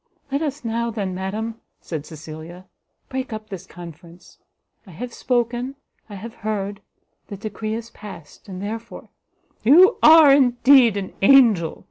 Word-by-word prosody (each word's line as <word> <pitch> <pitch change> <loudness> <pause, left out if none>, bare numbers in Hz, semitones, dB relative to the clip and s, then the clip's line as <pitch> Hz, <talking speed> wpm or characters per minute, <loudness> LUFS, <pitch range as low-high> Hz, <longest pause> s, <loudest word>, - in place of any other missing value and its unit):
"Let 280 +2 -1
us 295 -4 -4
now, 230 +1 -2
then, 200 -5 -4
madam," 215 +5 -5 0.2
said 155 -3 -7
Cecilia, 160 +3 -10 0.4
"break 260 -1 -5
up 215 0 -7
this 195 -4 -8
conference. 170 0 -13 0.5
I - - -13
have 235 +8 -8
spoken, 245 +1 -2 0.3
I 205 - -9
have 220 +4 -9
heard, 205 -1 -4 0.5
the 200 - -8
decree 215 +1 -5
is 230 0 -8
past, 200 -2 -13
and 185 0 -7
therefore," 225 +3 -7 0.5
"You 350 - +6
are 315 -3 +8
indeed 250 -3 +5
an 195 -2 -5
angel!" 215 -8 +4
220 Hz, 140 wpm, -21 LUFS, 190-245 Hz, 0.5 s, are